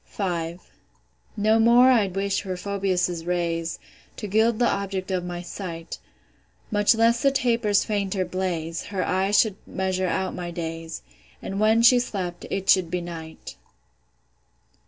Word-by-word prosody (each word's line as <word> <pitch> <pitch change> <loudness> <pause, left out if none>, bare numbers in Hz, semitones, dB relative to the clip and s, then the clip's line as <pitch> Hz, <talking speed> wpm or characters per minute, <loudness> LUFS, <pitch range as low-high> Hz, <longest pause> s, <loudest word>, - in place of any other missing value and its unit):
V. 170 -4 -2 0.8
No 215 +2 +3
more 240 +3 +6
I'd 205 -7 +2
wish 195 0 0
for 185 -2 -5
Phoebus' 185 -3 -1
rays, 170 -1 -2 0.4
To - - -5
gild 220 +3 +2
the 240 - +2
object 195 -1 -2
of 185 -1 -1
my 175 0 -5
sight; 170 -2 -7 0.7
Much 205 +2 +4
less 230 +1 +3
the 275 - +4
taper's 235 -6 +2
fainter 200 -3 -1
blaze: 170 -3 -3
Her 195 -3 -2
eyes 195 +2 +1
should 210 -4 +2
measure 185 0 -1
out 190 +2 -1
my 175 -1 -5
days; 165 -1 -6 0.4
And 195 - -5
when 220 +2 +4
she 245 +1 +7
slept, 185 -7 -4
it 195 0 -3
should 185 -3 +4
be 180 - -1
night. 165 -2 -9
190 Hz, 145 wpm, -24 LUFS, 175-210 Hz, 0.8 s, she